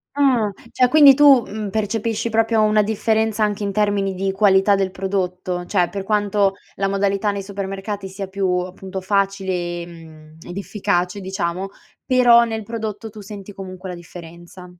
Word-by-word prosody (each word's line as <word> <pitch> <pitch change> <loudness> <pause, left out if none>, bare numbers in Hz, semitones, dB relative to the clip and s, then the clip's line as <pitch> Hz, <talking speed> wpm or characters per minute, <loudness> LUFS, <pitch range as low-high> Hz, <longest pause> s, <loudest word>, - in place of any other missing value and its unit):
Ah. 255 -7 +2 0.2
Cioè, 250 -1 +3
quindi 285 -1 +8
tu, 280 -3 +6
mhmm, 210 -1 -5
percepisci 220 +2 -2
proprio 225 0 +2
una 215 0 +3
differenza, 220 0 0
anche 210 0 -2
in 200 - -1
termini 200 -2 0
di 195 +1 -1
qualità 195 0 +4
del 195 -1 0
prodotto? 185 -2 -3
Cioè, 180 -3 +1
per 200 -1 -5
quanto 205 -1 +1 0.2
la 195 0 -1
modalità 200 +1 0
nei 200 -1 -4
supermercati 195 0 -5
sia 190 +1 -6
più 190 0 -2
,appunto, 185 +1 -6
facile, 195 0 0 0.3
ehm, 160 -2 -13
ed 175 +2 -9
efficace 190 -2 -1
diciamo, 190 0 -3 0.4
però 245 -2 +5
nel 220 -2 -4
prodotto 220 -1 -5
tu 210 0 -12
senti 200 0 -9
comunque 185 -1 -9
la 180 - -5
differenza. 175 +1 -12
200 Hz, 160 wpm, -20 LUFS, 190-215 Hz, 0.4 s, quindi